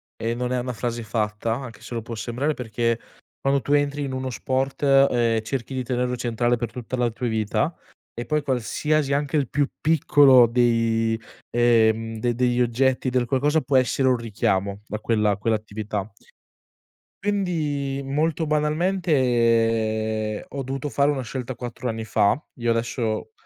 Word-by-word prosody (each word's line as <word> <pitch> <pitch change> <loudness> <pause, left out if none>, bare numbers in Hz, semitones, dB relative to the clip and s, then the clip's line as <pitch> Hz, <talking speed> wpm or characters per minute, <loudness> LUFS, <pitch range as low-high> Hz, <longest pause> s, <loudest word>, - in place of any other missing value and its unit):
e 115 +1 -2
non 125 0 -2
è 125 - +1
una 125 +1 -3
frase 120 0 -3
fatta, 110 +1 -1
anche 125 -3 -8
se 120 - -7
lo 115 - -3
può 115 - -7
sembrare. 125 +7 -2
Perché 115 -2 -1 0.4
quando 135 0 +2
tu 145 - -1
entri 145 0 +1
in 135 -1 -4
uno 130 0 -3
sport, 130 +3 -2
ehm, 125 -5 +4
cerchi 130 +3 -4
di 130 -1 -2
tenerlo 125 0 -1
centrale 120 0 0
per 120 - -4
tutta 125 0 -5
la 120 -1 +1
tua 120 +2 -4
vita, 110 -2 0 0.4
e 120 - -5
poi 150 -1 0
qualsiasi 140 +3 0
anche 145 +1 -1
il 140 -4 0
più 145 -1 +1
piccolo 140 -5 +6
dei, 115 -1 +2 0.3
ehm, 115 -2 +2
de 120 0 0
degli 125 0 +1
oggetti 130 +2 +1
del 125 -1 +1
qualcosa 145 +5 +1
può 135 +1 +2
essere 130 +1 +2
un 125 - +3
richiamo 100 -3 -1
da 105 - -4
quella 105 -3 +1
quell'attività 105 -1 -3 1.1
quindi, 155 -9 -1
molto 155 +3 0
banalmente, 115 - +1
ho 140 -1 -5
dovuto 135 +2 -4
fare 140 +1 +2
una 135 -3 -2
scelta 125 0 -5
4 125 0 -5
anni 115 -1 -3
fa. 105 +4 +2 0.2
Io 120 0 0
adesso, 115 - -1
125 Hz, 160 wpm, -24 LUFS, 115-135 Hz, 1.1 s, piccolo